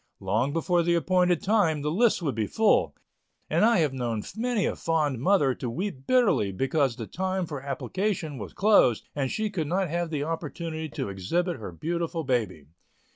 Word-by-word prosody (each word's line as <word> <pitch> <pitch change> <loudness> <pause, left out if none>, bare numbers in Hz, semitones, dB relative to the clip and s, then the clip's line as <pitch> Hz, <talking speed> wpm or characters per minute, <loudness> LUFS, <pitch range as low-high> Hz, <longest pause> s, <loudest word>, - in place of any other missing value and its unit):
Long 110 +8 0
before 170 +3 +1
the 170 +1 +2
appointed 180 0 +2
time, 170 -8 +2
the 150 - 0
list 210 +1 +2
would 140 -5 0
be 110 -1 -1
full 220 -1 +2 0.6
and - - +3
I 230 0 +5
have 150 -4 +1
known 120 -5 -2
many 235 -2 0
a - - -1
fond 150 -6 0
mother 145 -3 +3
to 125 - -5
weep 135 - -5
bitterly 235 - +3
because 135 +4 0
the 115 - -6
time 185 - -2
for 145 -4 -6
application 160 - -3
was 100 - -7
closed 200 - +4
and 135 -2 -1
she 215 -1 -2
could 165 -6 -2
not 185 +2 0
have 170 0 -1
the 150 -3 -2
opportunity 160 0 -4
to 100 - -4
exhibit 165 - -1
her 105 -6 -7
beautiful 165 - -3
baby. 110 - -1
160 Hz, 180 wpm, -27 LUFS, 130-185 Hz, 0.6 s, I